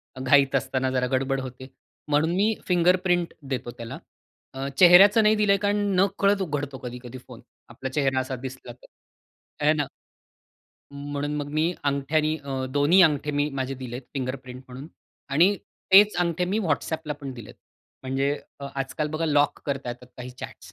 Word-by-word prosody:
अ, - - -9
घाईत 135 +1 +4
असताना 130 0 0
जरा 125 -1 0
गडबड 135 +1 0
होते. 130 +1 -9 0.4
म्हणून 150 +3 +2
मी 215 +3 +2
फिंगरप्रिंट 180 0 +2 0.2
देतो 125 -2 -3
त्याला. 115 -1 -7 0.6
अ, 135 +1 -4
चेहऱ्याचं 195 +5 +8
नाही 215 +1 +4
दिलं 210 -1 +2
आहे, 200 - +4
कारण 205 0 +1 0.2
नकळत 200 +1 +2
उघडतो 145 -5 -3
कधी-कधी 125 0 -8
फोन, 125 -3 -12 0.3
आपला 130 +3 -6
चेहरा 135 -1 0
असा 130 0 -3
दिसला 130 -1 -8
तर, 125 - -17 0.8
हे 155 - +5
ना. 145 -2 -1 1.1
म्हणून 145 +1 -4
मग 145 -1 -4
मी 160 +3 +1
अंगठ्याने 150 +3 0
अ, 135 -3 -4
2न्ही 145 +7 +4
अंगठे 150 -2 +2
मी 145 +1 0
माझे 135 0 -3
दिले 125 -2 -7
आहेत 130 - -10
फिंगरप्रिंट 130 -1 -5
म्हणून 130 +4 -9 0.4
आणि 175 +8 +4 0.4
तेच 205 +1 +7
अंगठे 175 0 0
मी 195 +4 -1
WhatsAppला 160 -2 -2
पण 135 -2 -6
दिलेत. 115 -4 -11 0.5
म्हणजे 135 +2 0 0.3
अ, - - -6
आजकाल 135 +3 -3
बघा 155 +2 -2
लॉक 145 -1 +2
करता 135 -3 -3
येतात 125 +1 -7
काही 125 0 -7
चॅट्स 125 - -11
140 Hz, 165 wpm, -25 LUFS, 130-165 Hz, 1.1 s, चेहऱ्याचं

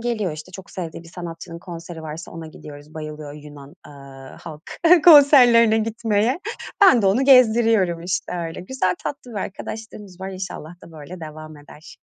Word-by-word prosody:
geliyor, 225 -7 -2
işte, 155 +4 -10
çok 190 +1 -11
sevdiği 170 -4 -7
bir 165 - -15
sanatçının 170 -1 -9
konseri 170 -2 -9
varsa 160 +2 -8
ona 165 -1 -8
gidiyoruz 150 -1 -13
bayılıyor 155 -1 -8
Yunan, 145 -1 -13
eee, - - -13 0.5
halk 155 -1 -10 0.4
konserlerine 250 -8 +7
gitmeye. 225 +2 0 0.4
Ben 255 - +6
de - - +2
onu 225 +8 +2
gezdiriyorum, 225 -9 +4
işte, 180 +1 -3 0.2
öyle. 165 - -8
Güzel 185 -3 -1
tatlı 260 -3 -6
bir 220 - -9
arkadaşlığımız 205 -1 -8
var. 190 - -5
İnşallah 185 -4 -7
da 165 - -14
böyle 160 +4 -10
devam 155 0 -10
eder. 150 +2 -15
180 Hz, 160 wpm, -21 LUFS, 155-225 Hz, 0.5 s, konserlerine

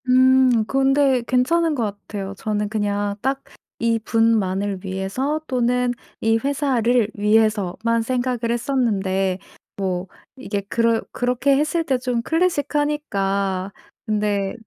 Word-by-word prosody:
음. 255 -2 +5
근데 270 0 +2
괜찮은 310 +6 +2
것 245 - -1
같아요. 200 -1 -5
저는 210 -1 -2
그냥 205 -1 -1
딱 270 +2 -1 0.4
이 230 -1 +3
분만을 205 -4 +1
위해서 195 +11 -2
또는 250 -1 +1 0.3
이 225 0 +2
회사를 250 -4 +1
위해서만 215 +1 +1
생각을 245 -1 -1
했었는데 200 -7 0 0.4
뭐 185 -2 -2 0.3
이게 210 -6 -3
그럴 230 -1 +2
그렇게 250 +3 +1
했을 310 +3 0
때 270 -5 0
좀 250 -1 -1
클래식하니까 285 - -1 0.3
근데 205 -3 0
230 Hz, 240 characters per minute, -21 LUFS, 205-260 Hz, 0.4 s, 음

